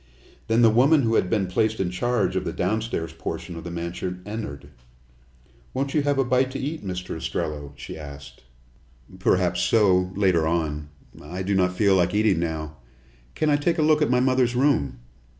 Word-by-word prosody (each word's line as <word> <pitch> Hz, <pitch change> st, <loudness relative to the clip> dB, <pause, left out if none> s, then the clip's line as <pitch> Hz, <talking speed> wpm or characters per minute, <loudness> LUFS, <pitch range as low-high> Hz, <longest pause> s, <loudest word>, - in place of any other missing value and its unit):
Then 115 Hz, +2 st, +3 dB
the 115 Hz, -, +7 dB
woman 135 Hz, +6 st, +4 dB
who 115 Hz, -1 st, +1 dB
had 95 Hz, -, +2 dB
been 105 Hz, -2 st, +1 dB
placed 110 Hz, +4 st, 0 dB
in 90 Hz, -2 st, -1 dB
charge 120 Hz, +7 st, 0 dB
of -, -, 0 dB
the -, -, -3 dB
downstairs 105 Hz, -3 st, -2 dB
portion 85 Hz, -, -6 dB
of 85 Hz, -, -7 dB
the 85 Hz, -, -6 dB
mansion 90 Hz, +2 st, -5 dB
entered. 105 Hz, -10 st, -6 dB, 1.1 s
"Won't 135 Hz, +1 st, -1 dB
you 150 Hz, -, +3 dB
have 145 Hz, -1 st, 0 dB
a 135 Hz, -, +2 dB
bite 130 Hz, +1 st, +2 dB
to -, -, -4 dB
eat, 150 Hz, +1 st, -4 dB
Mr. 90 Hz, -3 st, -5 dB
Ostrello?" 75 Hz, -3 st, -4 dB
she 70 Hz, +3 st, -8 dB
asked. 70 Hz, -1 st, -10 dB, 0.8 s
"Perhaps 90 Hz, -1 st, +2 dB
so, 95 Hz, -2 st, +3 dB
later 90 Hz, -5 st, +2 dB
on. 75 Hz, -3 st, -2 dB, 0.3 s
I 90 Hz, +5 st, -6 dB
do 100 Hz, +2 st, -1 dB
not 90 Hz, -1 st, +2 dB
feel 100 Hz, -3 st, +4 dB
like 90 Hz, +1 st, +2 dB
eating 105 Hz, -5 st, +3 dB
now. 80 Hz, -2 st, -4 dB, 0.6 s
Can 155 Hz, -1 st, +1 dB
I 145 Hz, -, +4 dB
take 165 Hz, +4 st, 0 dB
a 155 Hz, -, +2 dB
look 155 Hz, 0 st, +4 dB
at 150 Hz, -, +2 dB
my 125 Hz, 0 st, +3 dB
mother's 130 Hz, -1 st, +2 dB
room?" 80 Hz, -, +1 dB
95 Hz, 185 wpm, -24 LUFS, 85-125 Hz, 1.1 s, the